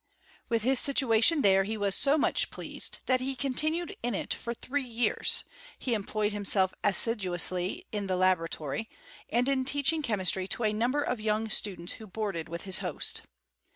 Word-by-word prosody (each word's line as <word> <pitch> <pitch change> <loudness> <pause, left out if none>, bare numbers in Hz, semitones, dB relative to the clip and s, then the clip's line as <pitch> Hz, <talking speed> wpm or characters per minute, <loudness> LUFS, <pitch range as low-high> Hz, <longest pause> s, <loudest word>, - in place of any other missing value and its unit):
With 230 -2 0
his 260 +1 +4
situation 270 +2 +3
there 195 -1 +5
he 220 +3 -4
was 200 -2 +1
so 280 +8 +3
much - - +3
pleased, - - -3
that 255 -1 +2
he 265 +1 -2
continued 310 +6 -1
in 240 -2 -1
it - - -2
for 235 - -4
three 285 +5 -3
years: 240 -3 0 0.3
he 250 - -2
employed 210 0 -1
him 205 0 -4
f 200 - 0
self 190 -2 +3
assiduously 185 -3 +1
ia 210 - -1
the 185 - 0
laboratory, 180 -1 0 0.4
and 240 +3 +1
in 270 -1 +1
teachmg 285 +3 +2
chemistry 190 -5 +1
to 235 - -3
a 215 -1 +2
number 250 +7 0
of 245 -5 -3
young 215 0 -1
students 185 -5 -1
who 220 - -11
boarded 195 -5 -4
with 170 0 -6
his 190 -1 -1
host. - - -3
220 Hz, 180 wpm, -29 LUFS, 190-255 Hz, 0.4 s, there